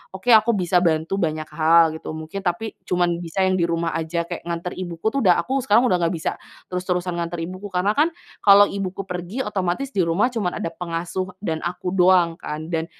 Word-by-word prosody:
oke 240 Hz, +6 st, 0 dB
aku 220 Hz, +1 st, +6 dB
bisa 180 Hz, -1 st, +2 dB
bantu 160 Hz, +2 st, +1 dB
banyak 155 Hz, -2 st, -1 dB
hal 165 Hz, +1 st, +4 dB
gitu -, -, -7 dB
mungkin, 160 Hz, +5 st, -6 dB
tapi 180 Hz, +5 st, -2 dB
cuman 175 Hz, -1 st, +1 dB
bisa 180 Hz, +3 st, -1 dB
yang 185 Hz, 0 st, +2 dB
di -, -, +2 dB
rumah 165 Hz, 0 st, -1 dB
aja," 165 Hz, +1 st, -1 dB
kayak 165 Hz, -, -7 dB
nganter 170 Hz, +1 st, -3 dB
ibuku 175 Hz, +3 st, -2 dB
tuh 275 Hz, -, -1 dB
udah 180 Hz, -2 st, +6 dB
aku 270 Hz, +1 st, -1 dB
sekarang 235 Hz, 0 st, +4 dB
udah 180 Hz, -5 st, +2 dB
enggak 170 Hz, 0 st, 0 dB
bisa 160 Hz, -, -2 dB, 0.4 s
terus-terusan 180 Hz, -1 st, -2 dB
nganter 170 Hz, 0 st, -3 dB
ibuku, 185 Hz, +4 st, -6 dB
karena 190 Hz, +2 st, +1 dB
kan 300 Hz, +8 st, +3 dB, 0.3 s
kalau 200 Hz, 0 st, +8 dB
ibuku 195 Hz, -1 st, -4 dB
pergi 180 Hz, +7 st, -4 dB
otomatis 195 Hz, +6 st, -2 dB
di 190 Hz, -, +2 dB
rumah 195 Hz, +10 st, +2 dB
cuman 205 Hz, -7 st, -2 dB
ada 165 Hz, -, -2 dB
pengasuh 175 Hz, +2 st, -4 dB
dan 160 Hz, -4 st, -1 dB
aku 180 Hz, +1 st, -3 dB
doang 180 Hz, -2 st, +4 dB
kan, 155 Hz, +2 st, -6 dB
dan 160 Hz, 0 st, -1 dB
180 Hz, 205 wpm, -22 LUFS, 170-195 Hz, 0.4 s, kalau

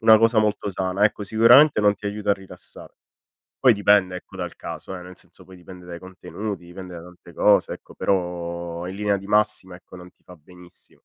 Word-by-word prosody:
una 110 Hz, -1 st, +7 dB
cosa 115 Hz, 0 st, +4 dB
molto 105 Hz, -1 st, 0 dB
sana. 95 Hz, +2 st, -1 dB
Ecco, 105 Hz, 0 st, 0 dB
sicuramente 115 Hz, +6 st, +5 dB
non 105 Hz, 0 st, +4 dB
ti 105 Hz, 0 st, -8 dB
aiuta 105 Hz, 0 st, -2 dB
a -, -, +6 dB
rilassare. 95 Hz, -1 st, -10 dB, 0.7 s
Poi 125 Hz, -3 st, +6 dB
dipende 100 Hz, -2 st, +3 dB
ecco -, -, -14 dB
dal -, -, -6 dB
caso, -, -, -8 dB
eh, 90 Hz, -, -8 dB
nel 90 Hz, 0 st, -12 dB
senso -, -, -14 dB
poi 95 Hz, -, -15 dB
dipende 90 Hz, 0 st, -13 dB
dai 85 Hz, -1 st, -8 dB
contenuti, 95 Hz, +1 st, -7 dB
dipende 90 Hz, +1 st, -10 dB
da 85 Hz, -, -8 dB
tante 90 Hz, 0 st, -15 dB
cose -, -, +3 dB
ecco, -, -, -14 dB
però 85 Hz, -2 st, -3 dB
in 95 Hz, -, -6 dB
linea 105 Hz, -1 st, 0 dB
di 95 Hz, -, -11 dB
massima, 105 Hz, -3 st, +1 dB
ecco, 90 Hz, +1 st, -15 dB
non 90 Hz, 0 st, -12 dB
ti -, -, -43 dB
fa 90 Hz, -, -14 dB
benissimo. 90 Hz, +3 st, -17 dB
95 Hz, 205 wpm, -23 LUFS, 90-105 Hz, 0.7 s, una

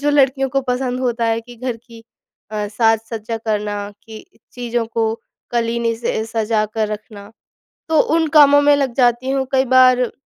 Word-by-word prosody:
जो 290 Hz, +1 st, +1 dB
लड़कियों 270 Hz, -1 st, +2 dB
को 275 Hz, +2 st, 0 dB
पसंद 250 Hz, 0 st, -1 dB
होता 240 Hz, -2 st, -1 dB
है 225 Hz, 0 st, 0 dB
कि 240 Hz, +1 st, -14 dB
घर 250 Hz, 0 st, -4 dB
की 230 Hz, 0 st, -16 dB, 0.5 s
अ, 210 Hz, -1 st, -3 dB
साज-सज्जा 225 Hz, +1 st, -1 dB
करना, 210 Hz, -2 st, -3 dB, 0.2 s
कि 220 Hz, -1 st, -10 dB, 0.3 s
चीज़ों 240 Hz, -1 st, -3 dB
को 225 Hz, -1 st, -1 dB, 0.4 s
कलीने 235 Hz, 0 st, 0 dB
से 225 Hz, -1 st, -2 dB
सजा 220 Hz, -1 st, 0 dB
कर 220 Hz, -1 st, 0 dB
रखना, 210 Hz, -1 st, -8 dB, 0.6 s
तो 315 Hz, -2 st, +3 dB, 0.2 s
उन 325 Hz, -1 st, +2 dB
कामों 285 Hz, -1 st, +7 dB
में 290 Hz, 0 st, +5 dB
लग 275 Hz, -4 st, -1 dB
जाती 245 Hz, 0 st, +2 dB
हूँ। 270 Hz, -1 st, 0 dB
कई 265 Hz, 0 st, +2 dB
बार 255 Hz, -1 st, +5 dB
235 Hz, 170 wpm, -18 LUFS, 225-260 Hz, 0.6 s, कामों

